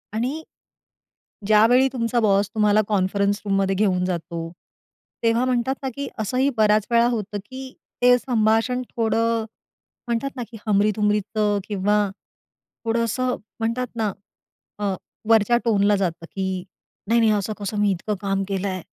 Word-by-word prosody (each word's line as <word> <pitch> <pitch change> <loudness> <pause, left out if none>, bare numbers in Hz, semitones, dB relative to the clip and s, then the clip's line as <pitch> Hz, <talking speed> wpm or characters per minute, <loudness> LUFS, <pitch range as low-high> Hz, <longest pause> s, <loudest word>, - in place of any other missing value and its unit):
आणि 260 +8 -2 1.0
ज्यावेळी 225 +5 +5
तुमचा 235 -1 0
बॉस 200 -2 +3
तुम्हाला 210 -1 +4
कॉन्फरन्स 200 0 +1
रूम 195 -1 +1
मध्ये 195 0 +1
घेऊन 185 -3 +2
जातो, 170 -2 -4 0.7
तेव्हा 230 +1 +2
म्हणतात 255 +1 +1
ना, 265 - -2
की 280 +1 -4
असंही 250 +6 +1
बऱ्याच 215 -1 +3
वेळा 235 0 +4
होतं 210 -3 -3
की 260 0 -8 0.3
ते 245 0 +7
संभाषण 235 +1 +1
थोडं 230 0 +1 0.6
म्हणतात 235 +4 -1
ना, 250 - -3
की 230 - -10
हमरी-तुमरीचं 210 0 +1
किंवा 205 0 +1 0.8
थोडं 230 +1 +1
असं 250 +2 -1 0.2
म्हणतात 230 +3 -1
ना, 220 -3 0 0.7
अ, 200 -2 0 0.4
वरच्या 225 +1 +5
टोनला 205 -2 +3
जातं 175 -4 -2
की 190 -1 -3 0.4
नाही, 230 +2 +3
नाही 225 -2 +4
असं 210 +1 0
कसं 205 +1 -4
मी 205 -1 +3
इतकं 195 +3 -2
काम 195 -1 0
केलं 195 0 -2
आहे 185 -2 -3
215 Hz, 145 wpm, -23 LUFS, 200-235 Hz, 1.0 s, ते